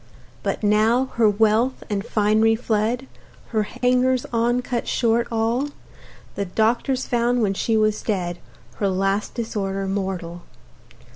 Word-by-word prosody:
But - - -3
now, 220 +5 +3
her 225 -2 +5
wealth 220 +5 +2
and 200 -2 -2
finery 215 +1 +2
fled, 225 +2 -1 0.4
Her 220 -2 +1
hangers 250 +3 +1
on 240 +2 +1
cut 245 -2 -3
short 235 0 +1
all; 230 +5 0 0.6
The 200 - -3
doctors 235 +7 0
found, 240 0 +1
when 195 -2 +1
she 220 +3 0
was 215 -1 +1
dead 175 -5 -2 0.4
Her 200 - +1
last 195 +2 -1
disorder 195 -4 -2
mortal. 190 -3 -3
220 Hz, 130 wpm, -22 LUFS, 200-240 Hz, 0.6 s, her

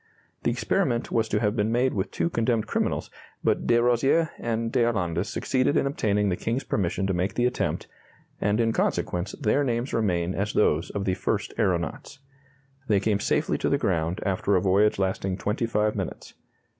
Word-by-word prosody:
The - - +1
experiment 120 +2 0
was 110 -1 +1
to 105 - +1
have 105 -1 +1
been 105 0 +1
made 125 +2 +2
with 95 -1 -1
two 170 - -1
condemned 115 -3 +1
criminals, - - -1 0.3
but - - +1
de 120 - +4
Rozier 125 +7 +3
and 115 0 -2
d'Arlandes 95 -7 0
succeeded 130 +3 +1
in - - +2
obtaining 105 -7 +1
the 90 - +1
King's 120 +8 -2
permission 95 -1 -1
to 95 - 0
make 90 +3 -1
the 120 - +2
attempt, 125 - -1 0.6
and 105 +2 +1
in 115 -1 +2
consequence 90 -2 -1
their 140 +1 +1
names 120 0 -1
remain 90 -5 0
as 105 +2 -2
those 85 -4 +2
of 100 -1 -3
the 95 - +1
first - - -2
aeronauts. 95 - -1 0.7
They 105 -4 +3
came 100 0 +1
safely - - 0
to - - 0
the - - +2
ground 80 +2 -1
after 100 +1 +1
a - - +4
voyage 100 +3 +3
lasting 95 -1 -1
twenty 105 +4 -1
five 105 -1 +1
minutes. 95 -4 -5
105 Hz, 180 wpm, -26 LUFS, 95-120 Hz, 0.7 s, de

